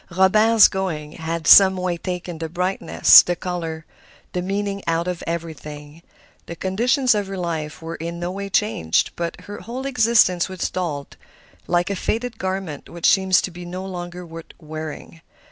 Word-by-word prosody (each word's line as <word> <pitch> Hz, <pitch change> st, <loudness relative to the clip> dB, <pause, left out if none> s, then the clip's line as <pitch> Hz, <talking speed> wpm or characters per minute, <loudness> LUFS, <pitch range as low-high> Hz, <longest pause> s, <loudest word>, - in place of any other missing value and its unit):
Robert's 215 Hz, +5 st, +5 dB
going 165 Hz, -6 st, -4 dB
had 165 Hz, 0 st, -5 dB
some 190 Hz, +1 st, +8 dB
way 180 Hz, -1 st, -1 dB
taken 175 Hz, -1 st, -5 dB
the 165 Hz, -1 st, -4 dB
brightness, 180 Hz, +3 st, +5 dB
the 175 Hz, -, -2 dB
color, 165 Hz, -3 st, -5 dB, 0.5 s
the 180 Hz, -, -1 dB
meaning 200 Hz, +1 st, -3 dB
out 165 Hz, +1 st, 0 dB
of 180 Hz, -2 st, -4 dB
everything. 155 Hz, -2 st, -7 dB, 0.5 s
The 170 Hz, -, -6 dB
conditions 240 Hz, -, +1 dB
of 205 Hz, -2 st, -2 dB
her 195 Hz, 0 st, -6 dB
life 160 Hz, -3 st, -4 dB
were 165 Hz, +1 st, -6 dB
in 170 Hz, +1 st, -6 dB
no 175 Hz, +1 st, -3 dB
way 200 Hz, +1 st, -5 dB
changed, 190 Hz, -, +1 dB
but 170 Hz, -1 st, -4 dB
her 205 Hz, -, -9 dB
whole 250 Hz, +4 st, -7 dB
existence 225 Hz, -9 st, +3 dB
was 185 Hz, -1 st, -3 dB
dulled, 155 Hz, -6 st, -4 dB, 0.5 s
like 175 Hz, +2 st, +1 dB
a -, -, -1 dB
faded 230 Hz, +4 st, -3 dB
garment 185 Hz, -6 st, -4 dB
which 170 Hz, -1 st, -6 dB
seems 190 Hz, -1 st, +4 dB
to 185 Hz, -, -4 dB
be 175 Hz, +1 st, -10 dB
no 180 Hz, +2 st, -6 dB
longer 180 Hz, -1 st, -7 dB
worth 165 Hz, 0 st, -11 dB
wearing. 155 Hz, 0 st, -8 dB
180 Hz, 165 wpm, -21 LUFS, 165-195 Hz, 0.5 s, some